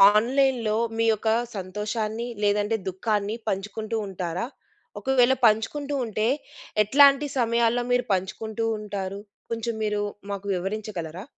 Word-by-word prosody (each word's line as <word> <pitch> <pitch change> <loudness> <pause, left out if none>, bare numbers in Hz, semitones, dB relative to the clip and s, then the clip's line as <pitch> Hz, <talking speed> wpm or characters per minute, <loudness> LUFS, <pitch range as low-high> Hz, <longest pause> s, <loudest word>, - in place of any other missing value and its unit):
ఆన్‌లైన్‌లో 240 -2 +2 0.2
మీ 230 - +2
యొక్క 220 +1 0 0.3
సంతోషాన్ని, 215 +4 -3 0.2
లేదంటే 205 +2 +2
దుఖాన్ని 205 +2 -1
పంచుకుంటూ 215 +3 -3
ఉంటారా? 180 +1 -3 0.6
ఒకవేళ 260 +2 +4
పంచుకుంటూ 280 +7 0
ఉంటే, 220 0 0 0.6
ఎట్లాంటి 280 +5 +6
సమయాల్లో 235 0 +2
మీరు 245 0 +2
పంచుకుంటూ 215 +4 -2
ఉంటారు? 200 -2 -4 0.3
కొంచెం 230 0 -2
మీరు 210 -1 0 0.3
మాకు 200 0 -5
వివరించగలరా? 185 -2 -4
215 Hz, 105 wpm, -25 LUFS, 200-235 Hz, 0.6 s, ఎట్లాంటి